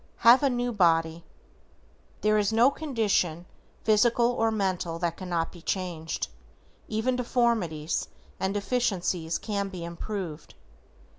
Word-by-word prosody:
=HAVE 240 Hz, +4 st, +8 dB
A 280 Hz, -, +3 dB
NEW 245 Hz, -1 st, -1 dB
BODY:= 165 Hz, -4 st, +2 dB, 1.0 s
There 215 Hz, 0 st, +3 dB
is 205 Hz, 0 st, +1 dB
no 235 Hz, +5 st, +5 dB
condition 210 Hz, -, 0 dB, 0.4 s
physical 235 Hz, +2 st, +4 dB
or 225 Hz, -2 st, +1 dB
mental 185 Hz, -5 st, -1 dB
that 170 Hz, -1 st, -1 dB
cannot 175 Hz, -3 st, -2 dB
be 175 Hz, -, -13 dB
changed, 165 Hz, -3 st, -3 dB, 0.6 s
even 220 Hz, +4 st, 0 dB
deformities, 230 Hz, -11 st, 0 dB, 0.3 s
and 190 Hz, -, 0 dB
deficiencies 195 Hz, -6 st, -1 dB
can 200 Hz, -2 st, -3 dB
be 180 Hz, -3 st, -6 dB
improved. 170 Hz, -2 st, -6 dB
200 Hz, 120 wpm, -27 LUFS, 170-230 Hz, 1.0 s, =HAVE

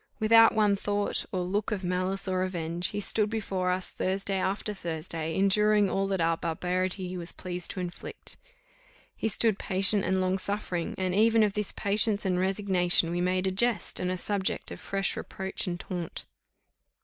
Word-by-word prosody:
Without 225 Hz, +1 st, +6 dB
one 210 Hz, -2 st, +4 dB
thought 205 Hz, +1 st, -1 dB
or 185 Hz, -, -1 dB
look 200 Hz, +5 st, -1 dB
of 200 Hz, -3 st, -2 dB
malice 185 Hz, +2 st, -1 dB
or 185 Hz, -1 st, 0 dB
revenge, 175 Hz, -2 st, -1 dB
he 205 Hz, -, -3 dB
stood 210 Hz, +1 st, +1 dB
before 195 Hz, -4 st, -1 dB
us 185 Hz, 0 st, -1 dB
Thursday 195 Hz, +1 st, -1 dB
after 200 Hz, +3 st, -1 dB
Thursday, 160 Hz, -3 st, -4 dB
enduring 205 Hz, +1 st, +3 dB
all 195 Hz, 0 st, 0 dB
that 195 Hz, -1 st, -1 dB
our 165 Hz, 0 st, +2 dB
barbarity 180 Hz, +3 st, -2 dB
was 175 Hz, -1 st, -5 dB
pleased 180 Hz, -2 st, -5 dB
to -, -, -5 dB
inflict; 175 Hz, -1 st, -7 dB, 0.8 s
he -, -, -1 dB
stood 220 Hz, 0 st, +2 dB
patient 195 Hz, +1 st, +2 dB
and 190 Hz, +1 st, +1 dB
long 185 Hz, +1 st, +1 dB
suffering, 185 Hz, -4 st, -2 dB
and 185 Hz, -1 st, -1 dB
even 225 Hz, +2 st, +4 dB
of 205 Hz, -2 st, +1 dB
this 210 Hz, -1 st, -2 dB
patience 205 Hz, +1 st, 0 dB
and 180 Hz, -1 st, +1 dB
resignation 185 Hz, -3 st, +2 dB
we 175 Hz, 0 st, -1 dB
made 185 Hz, +1 st, +1 dB
a 190 Hz, -, +1 dB
jest, 235 Hz, +4 st, +1 dB
and 180 Hz, -, -1 dB
a 185 Hz, -, -1 dB
subject 195 Hz, +1 st, -2 dB
of -, -, -7 dB
fresh 195 Hz, 0 st, -1 dB
reproach 190 Hz, +1 st, -4 dB
and 175 Hz, -1 st, -3 dB
taunt. 175 Hz, -3 st, -5 dB
190 Hz, 175 wpm, -28 LUFS, 180-205 Hz, 0.8 s, Without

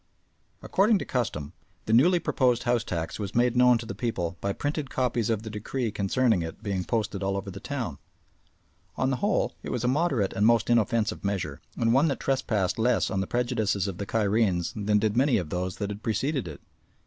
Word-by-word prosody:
According 210 Hz, +2 st, +3 dB
to -, -, -4 dB
custom, 105 Hz, -, -2 dB, 0.3 s
the 110 Hz, -, 0 dB
newly 170 Hz, +10 st, +5 dB
proposed 125 Hz, -7 st, +1 dB
house 120 Hz, -2 st, +1 dB
tax 85 Hz, -3 st, -4 dB
was 100 Hz, -2 st, -5 dB
made 120 Hz, 0 st, +3 dB
known 125 Hz, -1 st, +6 dB
to 115 Hz, -, -7 dB
the 115 Hz, -, -5 dB
people 90 Hz, -8 st, -2 dB
by 100 Hz, -, 0 dB
printed 145 Hz, +5 st, -3 dB
copies 120 Hz, -4 st, 0 dB
of 110 Hz, -1 st, 0 dB
the 110 Hz, -, -6 dB
decree 110 Hz, +3 st, -3 dB
concerning 105 Hz, +1 st, +1 dB
it 80 Hz, +6 st, -7 dB
being 100 Hz, -4 st, -1 dB
posted 105 Hz, -2 st, -2 dB
all 95 Hz, 0 st, 0 dB
over 100 Hz, 0 st, -5 dB
the 100 Hz, -, -8 dB
town. 115 Hz, -, -4 dB, 1.0 s
On 130 Hz, 0 st, 0 dB
the 130 Hz, -, 0 dB
whole 205 Hz, +6 st, 0 dB
it -, -, -7 dB
was 125 Hz, -, -2 dB
a -, -, +1 dB
moderate 130 Hz, -, +1 dB
and 100 Hz, -, 0 dB
most 115 Hz, 0 st, +3 dB
inoffensive 115 Hz, -1 st, +1 dB
measure, 90 Hz, -7 st, -2 dB, 0.2 s
and 115 Hz, -1 st, +2 dB
one 135 Hz, +5 st, +4 dB
that 140 Hz, -, -1 dB
trespassed 110 Hz, -8 st, 0 dB
less 120 Hz, +1 st, +2 dB
on 95 Hz, -2 st, 0 dB
the 95 Hz, -, -3 dB
prejudices 110 Hz, -5 st, 0 dB
of 95 Hz, -3 st, -5 dB
the 100 Hz, -, -4 dB
Cairenes 105 Hz, -5 st, +1 dB
than 105 Hz, 0 st, +1 dB
did 105 Hz, +1 st, +1 dB
many 130 Hz, +2 st, +3 dB
of 85 Hz, -6 st, -4 dB
those 90 Hz, +1 st, -2 dB
that 100 Hz, -1 st, -3 dB
had 105 Hz, +1 st, -7 dB
preceded 125 Hz, -, -1 dB
it. 75 Hz, -4 st, -9 dB
110 Hz, 205 wpm, -27 LUFS, 100-125 Hz, 1.0 s, known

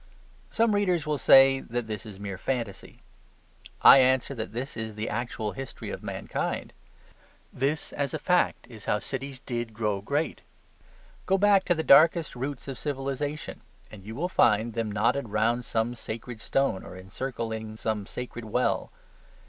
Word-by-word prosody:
Some 225 Hz, -1 st, +2 dB
readers 180 Hz, -6 st, +1 dB
will 150 Hz, -2 st, -1 dB
say 135 Hz, 0 st, +7 dB
that 120 Hz, -2 st, -4 dB
this 110 Hz, 0 st, -6 dB
is 100 Hz, -3 st, -9 dB
a -, -, -13 dB
mere 100 Hz, -2 st, -5 dB
fantasy. 115 Hz, -6 st, -4 dB, 0.8 s
I 135 Hz, -, +10 dB
answer 130 Hz, +1 st, +3 dB
that 110 Hz, -5 st, -5 dB
this 125 Hz, +5 st, -5 dB
is 110 Hz, -1 st, -5 dB
the 110 Hz, +1 st, -3 dB
actual 110 Hz, -2 st, -3 dB
history 135 Hz, -1 st, -7 dB
of -, -, -6 dB
mankind. -, -, -4 dB, 0.8 s
This, 140 Hz, +4 st, -1 dB
as 140 Hz, -1 st, -2 dB
a 155 Hz, -, -2 dB
fact, 180 Hz, +4 st, +1 dB
is 110 Hz, -4 st, -12 dB
how 105 Hz, -, +2 dB
cities 135 Hz, +5 st, -5 dB
did 120 Hz, -3 st, -5 dB
grow 105 Hz, -3 st, -1 dB
great. 145 Hz, +9 st, -2 dB, 0.9 s
Go 195 Hz, -, +3 dB
back 200 Hz, -1 st, +4 dB
to 175 Hz, -, +2 dB
the 160 Hz, -, -2 dB
darkest 160 Hz, +2 st, +5 dB
roots 135 Hz, +2 st, -5 dB
of 135 Hz, -4 st, -5 dB
civilization 145 Hz, +1 st, -4 dB, 0.3 s
and 100 Hz, -3 st, -11 dB
you 110 Hz, +3 st, -8 dB
will 170 Hz, +7 st, -1 dB
find 115 Hz, -, +3 dB
them 115 Hz, -2 st, -2 dB
knotted 120 Hz, +4 st, +1 dB
round 115 Hz, +4 st, +1 dB
some 115 Hz, +2 st, -1 dB
sacred 115 Hz, 0 st, -7 dB
stone 135 Hz, -9 st, 0 dB
or 90 Hz, -, -10 dB
encircling 110 Hz, +2 st, -5 dB
some 105 Hz, -3 st, -2 dB
sacred 120 Hz, -2 st, -6 dB
well. 125 Hz, +4 st, 0 dB
120 Hz, 165 wpm, -27 LUFS, 110-140 Hz, 0.9 s, I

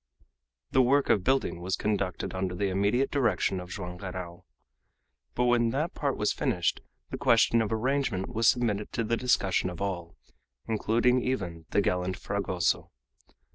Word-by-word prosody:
The 130 Hz, -, +5 dB
work 140 Hz, +3 st, +3 dB
of 100 Hz, -, +2 dB
building 130 Hz, -7 st, +1 dB
was 90 Hz, +1 st, -1 dB
conducted 100 Hz, -4 st, -2 dB
under 95 Hz, -1 st, -2 dB
the 100 Hz, +1 st, 0 dB
immediate 100 Hz, +8 st, +1 dB
direction 110 Hz, -8 st, +1 dB
of 90 Hz, 0 st, -8 dB
Joam 90 Hz, -2 st, -6 dB
Garral. 90 Hz, -1 st, -7 dB, 0.9 s
But 125 Hz, -, +1 dB
when 120 Hz, -1 st, +3 dB
that 150 Hz, +7 st, -1 dB
part 140 Hz, -2 st, -1 dB
was 105 Hz, -, +1 dB
finished 90 Hz, -2 st, 0 dB, 0.3 s
the -, -, -4 dB
question 115 Hz, -, +4 dB
of 110 Hz, -, -2 dB
arrangement 120 Hz, -3 st, -1 dB
was 115 Hz, 0 st, +2 dB
submitted 105 Hz, -4 st, 0 dB
to 115 Hz, -, 0 dB
the 115 Hz, +1 st, 0 dB
discussion 95 Hz, -7 st, +1 dB
of 90 Hz, -, -8 dB
all, 90 Hz, -4 st, -4 dB, 0.5 s
including 115 Hz, +3 st, +2 dB
even 90 Hz, -11 st, -3 dB
the 100 Hz, -, +2 dB
gallant 90 Hz, -1 st, -1 dB
Fragoso. 100 Hz, -4 st, -1 dB
100 Hz, 155 wpm, -28 LUFS, 90-120 Hz, 0.9 s, The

